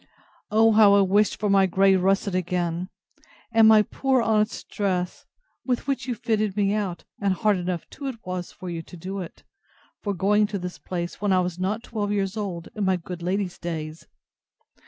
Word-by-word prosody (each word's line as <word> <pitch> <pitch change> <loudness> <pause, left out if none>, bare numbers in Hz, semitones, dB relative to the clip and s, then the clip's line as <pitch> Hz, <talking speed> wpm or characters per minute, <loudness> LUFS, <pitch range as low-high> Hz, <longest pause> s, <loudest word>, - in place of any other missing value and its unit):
—O 220 +1 +5
how 210 -2 +6
I 200 - +6
wished 200 +2 +2
for 210 - 0
my 195 -1 +4
grey 195 +1 +4
russet 195 +1 +1
again, 180 0 -1 0.6
and 225 -1 +6
my 215 -1 +7
poor 265 +3 0
honest 220 -1 0
dress, 185 -4 -2 0.4
with 250 -2 -1
which 275 -1 -2
you 245 - -1
fitted 215 -3 -1
me 200 -1 +2
out, 200 -5 -2 0.2
(and 200 -1 +2
hard 210 +1 +2
enough 180 -1 -3
too 280 - -7
it 260 -3 -4
was 180 -1 -4
for 185 - -10
you 170 -2 -4
to 175 - -13
do 190 +4 -5
it!) 175 -3 -9 0.6
for 205 -2 -2
going 205 +3 +3
to 205 -1 -3
this 180 -1 -6
place, 175 0 -5
when 205 -1 +1
I 185 - +4
was 180 -1 -3
not 205 +5 -1
twelve 210 -4 -3
years 195 -1 -1
old, 185 -6 -4
in 210 - -3
my 190 -1 +3
good 175 0 -8
lady's 185 +1 -2
days! 160 -2 -5
195 Hz, 195 wpm, -25 LUFS, 180-215 Hz, 0.6 s, my